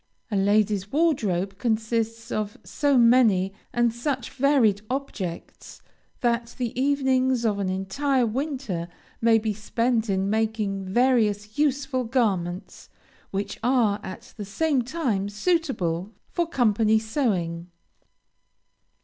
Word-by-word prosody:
A -, -, 0 dB
ladies' 205 Hz, 0 st, +2 dB
wardrobe 205 Hz, -, 0 dB
consists 230 Hz, 0 st, -1 dB
of 210 Hz, -1 st, -3 dB
so 285 Hz, -2 st, +1 dB
many, 230 Hz, -6 st, +4 dB, 0.2 s
and 240 Hz, -1 st, +2 dB
such 255 Hz, 0 st, -3 dB
varied 255 Hz, -7 st, +3 dB
objects, 230 Hz, -10 st, -5 dB, 0.4 s
that 235 Hz, -2 st, 0 dB
the 245 Hz, -3 st, -2 dB
evenings 260 Hz, -3 st, +2 dB
of 205 Hz, -2 st, +1 dB
an 195 Hz, -2 st, -1 dB
entire 245 Hz, +8 st, 0 dB
winter 245 Hz, -, -3 dB, 0.3 s
may 225 Hz, 0 st, +5 dB
be 215 Hz, -1 st, -1 dB
spent 230 Hz, +2 st, 0 dB
in 190 Hz, 0 st, +1 dB
making 215 Hz, -2 st, -1 dB
various 215 Hz, -1 st, +1 dB
useful 275 Hz, -3 st, +1 dB
garments, 200 Hz, -8 st, -2 dB, 0.4 s
which 200 Hz, +1 st, -4 dB
are, 230 Hz, -4 st, +2 dB
at 230 Hz, +7 st, -9 dB
the 210 Hz, -, -5 dB
same 275 Hz, +7 st, 0 dB
time, 240 Hz, -7 st, -1 dB
suitable 210 Hz, -, -1 dB, 0.2 s
for 345 Hz, -2 st, 0 dB
company 220 Hz, -5 st, +3 dB
sewing. 190 Hz, -, -1 dB
225 Hz, 115 wpm, -25 LUFS, 200-260 Hz, 0.4 s, may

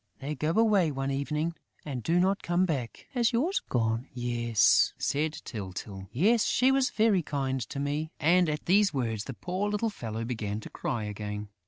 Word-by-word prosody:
"They 140 Hz, +2 st, -3 dB
go 150 Hz, +2 st, -1 dB
away 210 Hz, -6 st, +4 dB
one 135 Hz, 0 st, -2 dB
evening 150 Hz, +4 st, -1 dB, 0.3 s
and 135 Hz, -5 st, -4 dB
do 170 Hz, +9 st, +2 dB
not 195 Hz, +2 st, +2 dB
come 175 Hz, +2 st, +2 dB
back." 135 Hz, -9 st, -3 dB
"Has 240 Hz, -4 st, +2 dB
yours 305 Hz, -, +1 dB
gone?" 115 Hz, +1 st, 0 dB
"Yes," 120 Hz, -2 st, +3 dB
said 150 Hz, +2 st, 0 dB
Tyltyl. 95 Hz, -2 st, -6 dB, 0.3 s
"She 255 Hz, +4 st, +3 dB
was 270 Hz, -1 st, +3 dB
very 215 Hz, -5 st, +3 dB
kind 135 Hz, -4 st, -2 dB
to 140 Hz, -, -5 dB
me." 145 Hz, +3 st, -2 dB
And, 175 Hz, +2 st, +4 dB
at 150 Hz, 0 st, -3 dB
these 200 Hz, +3 st, +4 dB
words, 115 Hz, -5 st, -1 dB
the 135 Hz, -, -6 dB
poor 185 Hz, -, -2 dB
little 210 Hz, +2 st, 0 dB
fellow 115 Hz, -, -5 dB
began 110 Hz, -3 st, -3 dB
to -, -, -10 dB
cry 120 Hz, -6 st, -3 dB
again. 105 Hz, 0 st, -5 dB
145 Hz, 175 wpm, -29 LUFS, 115-185 Hz, 0.3 s, away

